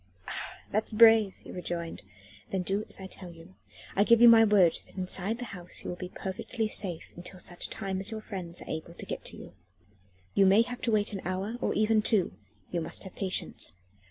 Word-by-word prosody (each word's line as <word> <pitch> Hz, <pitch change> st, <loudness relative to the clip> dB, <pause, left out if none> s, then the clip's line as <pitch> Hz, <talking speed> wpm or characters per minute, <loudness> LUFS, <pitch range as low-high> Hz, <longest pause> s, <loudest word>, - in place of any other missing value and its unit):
"Ah! -, -, -5 dB
that's 215 Hz, +2 st, 0 dB
brave!" 225 Hz, -3 st, +7 dB
he -, -, -10 dB
rejoined. 175 Hz, -2 st, -4 dB, 0.5 s
"Then 190 Hz, -1 st, -1 dB
do 195 Hz, +3 st, -1 dB
as -, -, -4 dB
I 190 Hz, -, -7 dB
tell 185 Hz, -1 st, -10 dB
you. 165 Hz, +2 st, -14 dB, 0.4 s
I 200 Hz, -, +5 dB
give 235 Hz, +1 st, +5 dB
you 240 Hz, -, +9 dB
my 230 Hz, -1 st, +9 dB
word 200 Hz, -6 st, +5 dB
that -, -, -18 dB
inside 190 Hz, +4 st, 0 dB
that 245 Hz, -, -5 dB
house 180 Hz, -2 st, -6 dB
you -, -, -4 dB
will -, -, -4 dB
be 180 Hz, 0 st, -7 dB
perfectly 210 Hz, +5 st, -3 dB
safe 185 Hz, -6 st, -4 dB
until 180 Hz, +2 st, -6 dB
such 175 Hz, 0 st, -2 dB
time 195 Hz, -3 st, -3 dB
as 195 Hz, +3 st, +3 dB
your 220 Hz, -1 st, -3 dB
friends 180 Hz, -5 st, -6 dB
are -, -, -14 dB
able 160 Hz, +2 st, -5 dB
to -, -, -7 dB
get -, -, -5 dB
to -, -, -5 dB
you. -, -, -11 dB, 0.8 s
You 195 Hz, -, +5 dB
may 200 Hz, +4 st, +6 dB
have 245 Hz, +1 st, -7 dB
to 235 Hz, -, 0 dB
wait 210 Hz, 0 st, +1 dB
an 195 Hz, -, -4 dB
hour, 190 Hz, +5 st, -2 dB
or -, -, 0 dB
even 215 Hz, 0 st, +3 dB
two; 210 Hz, -, +2 dB, 0.4 s
you 175 Hz, -, -1 dB
must 160 Hz, -, -4 dB
have 190 Hz, -, -10 dB
patience. 190 Hz, -2 st, -1 dB
195 Hz, 215 wpm, -29 LUFS, 180-215 Hz, 0.8 s, you